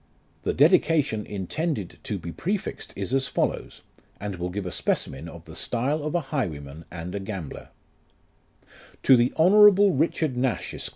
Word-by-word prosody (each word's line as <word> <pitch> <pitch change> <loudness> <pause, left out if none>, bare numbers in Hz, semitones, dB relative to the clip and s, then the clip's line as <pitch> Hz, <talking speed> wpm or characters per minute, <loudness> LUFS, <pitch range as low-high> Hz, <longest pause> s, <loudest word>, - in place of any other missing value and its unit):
2 - - 0
The - - +2
dedication 145 -9 +3
intended 105 - -3
to - - -3
be 85 - -7
prefixed 190 - -3
is 100 +5 -3
as 135 0 +2
follows, - - -2 0.4
and 100 -2 -5
will 90 +1 -3
give 95 +2 -4
a 90 - -4
specimen 75 0 -1
of 85 0 -12
the 80 - -11
style 135 +6 -1
of 150 +3 -3
a 175 - +2
highwayman 80 - -3
and 85 +1 -7
a 100 - -2
gambler: 95 -6 -7 1.3
"To 135 - +7
THE 120 0 +3
HoifOTTKABLE 200 +1 +7
RlCHARD 160 -2 +1
NASH, 125 -1 -1
ESQ. - - -4
115 Hz, 165 wpm, -25 LUFS, -, 1.3 s, To